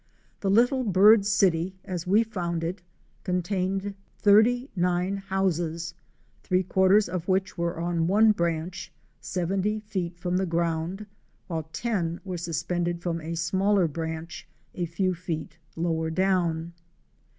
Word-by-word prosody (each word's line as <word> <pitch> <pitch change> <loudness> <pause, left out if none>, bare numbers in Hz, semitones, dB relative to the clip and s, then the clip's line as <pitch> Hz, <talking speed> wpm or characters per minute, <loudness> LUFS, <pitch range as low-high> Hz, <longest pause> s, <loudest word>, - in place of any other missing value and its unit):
The 195 - -1
little 245 +6 +4
bird 205 0 +6
city 185 -3 +2
as 180 -3 -4
we 205 +5 +5
found 175 -7 -3
it 180 +4 -3 0.4
contained 190 +2 -1 0.2
39 200 -4 +3
homes; 175 -4 -1 0.5
three 185 0 +1
quarters 190 +3 +4
of 175 -1 -4
which 190 0 0
were 170 -2 -2
on 170 -1 0
one 215 +4 +5
branch, 170 -1 -2 0.3
70 190 +4 -1
feet 185 -5 -4
from 180 +1 -1
the 190 0 0
ground, 170 +3 -1 0.4
while 160 -3 -4 0.2
ro 175 -7 0
were 185 -2 -4
suspended 170 +1 -2
from 170 -1 -3
a 165 +2 -4
smaller 190 +3 +2
branch, 160 +2 -5 0.3
a 175 -1 -2
few 185 +3 0
fect 170 -2 -5 0.2
lower 160 -1 0
down. 170 -2 0
180 Hz, 130 wpm, -26 LUFS, 170-195 Hz, 0.5 s, bird